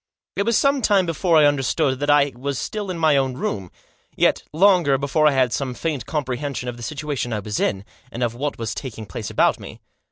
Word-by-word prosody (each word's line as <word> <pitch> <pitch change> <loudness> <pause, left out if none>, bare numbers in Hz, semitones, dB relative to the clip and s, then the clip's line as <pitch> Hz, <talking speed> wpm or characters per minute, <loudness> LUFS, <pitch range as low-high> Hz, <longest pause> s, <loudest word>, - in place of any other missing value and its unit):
It 200 - -1
was 230 - +3
some 275 -1 +2
time 200 -5 +3
before 165 0 +2
I 150 - +6
understood 140 -1 +1
that 145 +1 -2
I 145 -1 +4
was 135 +2 -3
still 210 - -4
in 180 - -3
my 160 -3 +3
own 135 -2 0
room; 100 -7 -3 0.5
yet, - - +2
longer 175 -5 +4
before 150 +3 +2
I - - +5
had 130 -3 +2
some 130 -3 -2
faint 150 -7 -3
comprehension 140 -3 -3
of 120 - -4
the 120 - -12
situation 145 -1 -4
I 110 - -1
was 105 0 -4
in, 95 0 -1 0.3
and 120 - -3
of 120 -1 0
what 140 +4 -3
was 115 -2 -3
taking 115 -5 -7
place 95 - -6
about - - +2
me. - - -10
140 Hz, 220 wpm, -22 LUFS, 125-160 Hz, 0.5 s, I